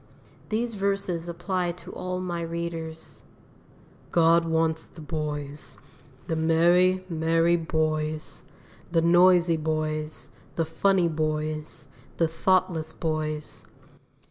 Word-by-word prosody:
These 230 +2 -1
verses 195 -4 -1
apply 175 0 -1
to 180 - -11
all 180 0 -4
my 175 -2 -3
readers: 165 -1 -5 0.9
"God 165 0 +4
wants 160 -1 0
the - - -16
boys, 150 -2 -5 0.5
the 165 - -2
merry, 175 +3 +3
merry 165 0 +2
boys, 155 -2 -2 0.5
The 165 -1 +3
noisy 175 0 +5
boys, 155 0 -2 0.2
the 165 - +1
funny 180 +2 +2
boys, 155 -1 -3 0.3
The 165 - +3
thoughtless 165 -1 +1
boys. 155 -2 -3
165 Hz, 100 wpm, -26 LUFS, 155-175 Hz, 0.9 s, noisy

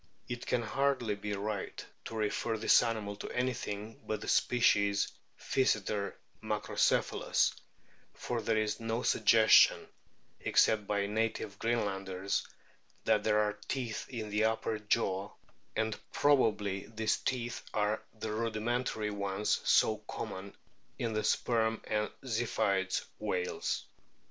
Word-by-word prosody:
It 120 -1 -5
can 120 -2 +1
hardly 130 -1 +1
be 105 0 -4
right 100 0 -4 0.2
to 115 - -6
refer 110 +1 -1
this 110 - +5
animal 110 -3 -2
to - - -6
anything 110 -4 -3
but 110 -1 -2
the - - -7
species 100 -4 +3 0.3
Physeter 105 -5 0 0.3
macrocepkalus, - - +1 0.6
for 120 -2 -3
there 110 0 +1
is 105 0 0
no 115 +1 -2
suggestion, 110 -1 +5 0.5
except 110 -2 +3
by 100 -1 +1
native 105 -1 -2
Greenlanders, 100 -4 -1 0.6
that - - +3
there 105 0 +3
are 105 -1 -1
teeth 125 -5 -3
in 110 -5 -5
the 105 +1 +2
upper 110 0 0
jaw, 100 -2 0 0.4
and 110 0 -1
probably 105 -9 +2
these 110 -1 0
teeth 120 -2 -2
are 105 0 0
the 110 -1 -5
rudimentary 110 0 -1
ones 100 0 -1
so - - +4
common 95 +1 -6 0.4
in 115 -2 -2
the 110 0 0
Sperm 110 +1 +1
and 105 0 -1
Ziphioid 110 -6 0
whales. 90 -4 -2
110 Hz, 120 wpm, -32 LUFS, 105-115 Hz, 0.6 s, this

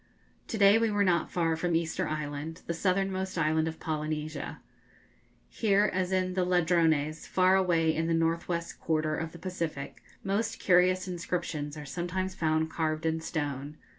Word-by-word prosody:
To 225 - -3
day 200 +1 +6
we 230 0 +2
were 205 -1 +2
not 175 -4 +2
far 165 -2 +1
from 170 +1 0
Easter 165 -1 0
Island, 155 +2 -4
the 170 - -2
southernmost 190 +1 -1
island 160 0 +2
of 160 0 -5
Polynesia. 155 -1 -3 0.9
Here 210 -1 +2
as 185 0 0
in 185 -1 +1
the 185 0 +1
Ladrones, 165 -4 +2
far 185 0 +4
away 170 -4 +3
in 165 +1 -1
the 165 - +2
north 165 +1 0
west 170 -1 -3
quarter 155 -1 0
of 160 +1 -4
the 170 - -11
Pacific, 165 -6 -5 0.2
most 205 +3 -1
curious 185 0 +3
inscriptions 170 -4 -3
are 150 - -7
sometimes 180 +5 -3
found 160 -2 0
carved 155 -1 -1
in 160 0 0
stone. 145 -2 -4
165 Hz, 165 wpm, -29 LUFS, 155-185 Hz, 0.9 s, day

